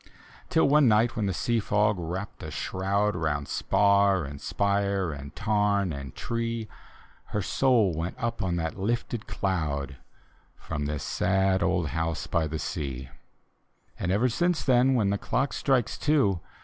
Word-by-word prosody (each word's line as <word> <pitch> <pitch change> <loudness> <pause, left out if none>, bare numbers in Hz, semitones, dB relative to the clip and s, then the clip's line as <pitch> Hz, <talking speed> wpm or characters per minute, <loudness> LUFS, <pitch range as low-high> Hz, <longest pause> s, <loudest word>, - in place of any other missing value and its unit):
Till 160 - +3
one 145 -2 +5
ni^t 110 +2 +4
when 105 -2 0
the - - 0
sea 115 +6 0
fog 105 -1 +1
wrapped 90 +4 -5
a - - -6
shroud 100 +2 -1
Round 75 -4 -1
spar 100 +1 +3
and 70 0 -8
spire 100 -3 0
and 70 0 -8
tarn 105 -4 +1
and 70 -2 -7
tree, 115 -1 -3 0.6
Her 105 - -3
soul 115 -6 +3
went 85 +3 -4
up 115 0 -2
on 90 -2 0
that 80 +2 -3
lifted 115 +2 -2
cloud 75 -8 -2 0.6
From 75 -3 -4
this 75 -1 -3
sad 95 0 +1
old 85 -5 +1
house 80 +2 -2
by 80 -2 0
the 80 +1 -3
sea. 70 -5 -4 0.9
And 90 - -1
ever 105 +6 +3
since 175 +7 0
then, 130 0 +4
when 105 -5 +2
the 100 - -1
clock 135 +2 -1
strikes 130 -5 0
two. 135 - +2
100 Hz, 155 wpm, -27 LUFS, 80-115 Hz, 0.9 s, one